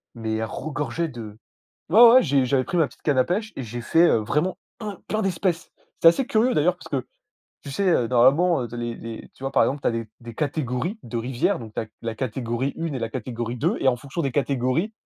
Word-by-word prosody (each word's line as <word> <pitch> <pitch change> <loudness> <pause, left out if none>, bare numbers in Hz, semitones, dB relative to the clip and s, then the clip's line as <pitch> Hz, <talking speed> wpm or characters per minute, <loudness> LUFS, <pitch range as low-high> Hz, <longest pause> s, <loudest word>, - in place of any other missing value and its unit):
mais 110 -1 -3
elle 110 0 -1
regorgeait 150 +5 -3
de 110 -6 -9 0.5
ouais, 215 +6 +6
ouais, 255 +2 +7
j'ai 140 -4 +2
j'avais 130 0 +2
pris 180 - -3
ma 160 -3 +4
petite - - -18
canne 145 -4 +1
à 130 - +5
pêche 210 +5 -2
et 135 - -4
j'ai 120 +2 -6
fait, 165 +8 +4
heu, - - +4
vraiment 150 - -1 0.2
un 205 -3 -5
plein 215 0 0
d'espèces. 180 -2 -1 0.3
C'est 165 - +10
assez 255 +10 +3
curieux 235 +3 +2
d'ailleurs 170 +4 +2
parce - - -12
que, 130 -3 -2 0.6
tu 140 - -8
sais, 195 +6 +1
heu, 125 -9 +2
normalement, 135 +7 +4
les 120 -1 -4
les 115 -1 -8
tu - - -14
vois, 135 - -2
par - - +5
exemple, 140 +1 -1
tu - - 0
as - - +3
des 115 -1 -4
des 115 -1 -9
catégories 150 - -2
de 120 0 -8
rivière, 120 +1 0
donc 110 -3 -10
tu - - -1
as - - -5 0.2
la 115 -1 -3
catégorie 120 +2 -2
1 165 -2 -3
et - - -3
la 115 - -3
catégorie 120 -1 -4
2 - - 0
et - - +1
en 125 - 0
fonction 140 +7 -5
des 135 -4 -1
catégories, 140 - 0
135 Hz, 240 wpm, -24 LUFS, 120-170 Hz, 0.6 s, C'est